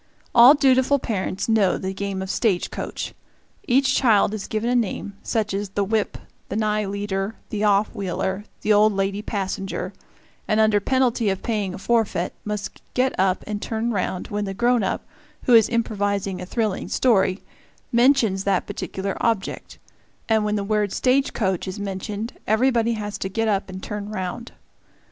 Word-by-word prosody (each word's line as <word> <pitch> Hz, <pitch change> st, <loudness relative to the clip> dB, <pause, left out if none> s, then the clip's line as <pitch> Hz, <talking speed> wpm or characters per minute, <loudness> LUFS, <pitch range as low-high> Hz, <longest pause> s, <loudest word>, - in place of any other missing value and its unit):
All 245 Hz, +5 st, +9 dB
dutiful 265 Hz, 0 st, +4 dB
parents 200 Hz, -7 st, -2 dB
know 220 Hz, -4 st, +3 dB
the 190 Hz, 0 st, -4 dB
game 195 Hz, -1 st, -3 dB
of 190 Hz, -, -3 dB
"stage 200 Hz, -7 st, 0 dB
coach"; -, -, -5 dB, 0.5 s
each 265 Hz, +2 st, +3 dB
child 215 Hz, -5 st, +4 dB
is 210 Hz, -3 st, -4 dB
given 220 Hz, +2 st, -2 dB
a -, -, +2 dB
name, 205 Hz, -3 st, -1 dB
such 215 Hz, -3 st, -1 dB
as 200 Hz, 0 st, -2 dB
the 200 Hz, +1 st, -1 dB
whip, 215 Hz, +1 st, -1 dB, 0.3 s
the -, -, -3 dB
nigh 215 Hz, -1 st, +1 dB
leader, 200 Hz, +1 st, -3 dB, 0.2 s
the 210 Hz, -1 st, -2 dB
off 205 Hz, 0 st, +3 dB
wheeler, 190 Hz, -1 st, -2 dB, 0.2 s
the 215 Hz, -, +3 dB
old 210 Hz, +1 st, +5 dB
lady 195 Hz, +1 st, -1 dB
passenger, 195 Hz, -2 st, -3 dB, 0.5 s
and, 215 Hz, 0 st, +2 dB
under 215 Hz, -1 st, +4 dB
penalty 245 Hz, -1 st, +1 dB
of 190 Hz, -1 st, -2 dB
paying 205 Hz, -5 st, -1 dB
a -, -, -7 dB
forfeit, 205 Hz, -4 st, 0 dB
must 210 Hz, -1 st, -5 dB
get 255 Hz, +1 st, +2 dB
up 190 Hz, 0 st, +2 dB
and 210 Hz, -1 st, -4 dB
turn 225 Hz, +1 st, -2 dB
round 185 Hz, -3 st, -2 dB
when 205 Hz, 0 st, -2 dB
the 195 Hz, -1 st, -5 dB
grown 240 Hz, +2 st, +3 dB
up, 195 Hz, -, -2 dB, 0.4 s
who 250 Hz, -, +3 dB
is 225 Hz, -2 st, +7 dB
improvising 205 Hz, -5 st, -1 dB
a 180 Hz, -, -7 dB
thrilling 215 Hz, -2 st, -1 dB
story, 200 Hz, -6 st, +2 dB, 0.5 s
mentions 235 Hz, -6 st, +3 dB
that 195 Hz, -2 st, +1 dB
particular 195 Hz, 0 st, -4 dB
object; 225 Hz, -4 st, -2 dB, 0.5 s
and 220 Hz, -1 st, +3 dB
when 210 Hz, 0 st, 0 dB
the 205 Hz, -, -1 dB
word 210 Hz, -1 st, 0 dB
"stage 265 Hz, +5 st, +2 dB
coach" 190 Hz, -4 st, -1 dB
is 190 Hz, +2 st, -5 dB
mentioned, 205 Hz, +3 st, -4 dB
everybody 235 Hz, +1 st, +2 dB
has 210 Hz, -2 st, -4 dB
to 190 Hz, -, -3 dB
get 225 Hz, +3 st, -1 dB
up 200 Hz, -2 st, 0 dB
and 185 Hz, 0 st, -8 dB
turn 210 Hz, 0 st, -5 dB
round. 215 Hz, +3 st, -5 dB
210 Hz, 170 wpm, -23 LUFS, 195-230 Hz, 0.5 s, All